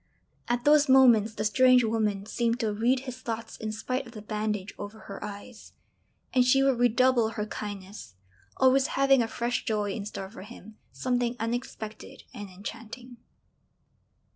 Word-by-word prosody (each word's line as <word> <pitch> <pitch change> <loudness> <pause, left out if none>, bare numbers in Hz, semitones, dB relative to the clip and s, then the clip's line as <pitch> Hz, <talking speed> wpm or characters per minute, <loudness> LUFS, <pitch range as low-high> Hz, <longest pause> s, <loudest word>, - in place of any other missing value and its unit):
At 240 +1 -1
those 295 -1 +5
moments 235 -5 +5
the 210 - -2
strange 255 +2 +5
woman 215 -3 -1
seemed 235 +2 -1
to 215 -2 0
read 245 +5 +1
his 255 -1 -8
thoughts 230 -1 -5
in 215 -1 -4
spite 255 +4 -3
of 235 - -13
the 215 - -8
bandage 210 -2 -3
over 205 +2 -8
her 200 - -9
eyes; 210 +3 -10 0.6
and 255 - +5
she 270 +2 +4
would 270 -3 +2
redouble 245 -1 +3
her 210 -2 -3
kindness, 200 - -8 0.4
always 265 +1 +4
having 275 -1 +5
a 230 - 0
fresh 240 +2 -2
joy 210 -2 -1
in 200 +1 -5
store 195 -2 -7
for 225 - -10
him, 215 0 -12 0.2
something 245 -1 -1
unexpected 225 -2 -5
and 205 -1 -8
enchanting. 230 +6 -9
230 Hz, 160 wpm, -27 LUFS, 210-250 Hz, 0.6 s, those